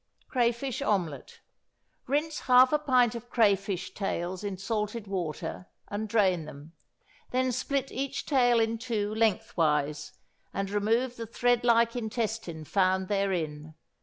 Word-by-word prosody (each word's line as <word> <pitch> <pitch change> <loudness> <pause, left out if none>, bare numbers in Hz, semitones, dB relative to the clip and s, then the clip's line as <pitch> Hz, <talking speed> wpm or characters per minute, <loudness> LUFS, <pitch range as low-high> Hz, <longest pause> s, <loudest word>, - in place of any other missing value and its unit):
=Crayfish 240 0 0
Omelet.= 175 -8 -2 0.7
Rinse 300 +3 0
half 255 +2 +5
a 300 - +4
pint 255 -6 +3
of 235 0 -8
crayfish 195 -5 +1
tails 185 -1 -3
in 200 -2 -3
salted 210 +2 -3
water, 160 - -4 0.2
and 210 +1 -3
drain 190 -7 +2
them; 150 +2 -11 0.6
then 255 0 +1
split 270 +2 -2
each 275 +1 -3
tail 245 -4 +4
in 225 0 0
two 215 -4 -2
lengthwise, 160 -10 0 0.4
and 195 0 -2
remove 230 +5 +1
the 230 -1 -5
thread 245 +1 +1
like 235 -1 +4
intestine 220 -8 -3
found 190 +1 +1
therein. 160 -7 -2
215 Hz, 130 wpm, -28 LUFS, 185-245 Hz, 0.7 s, half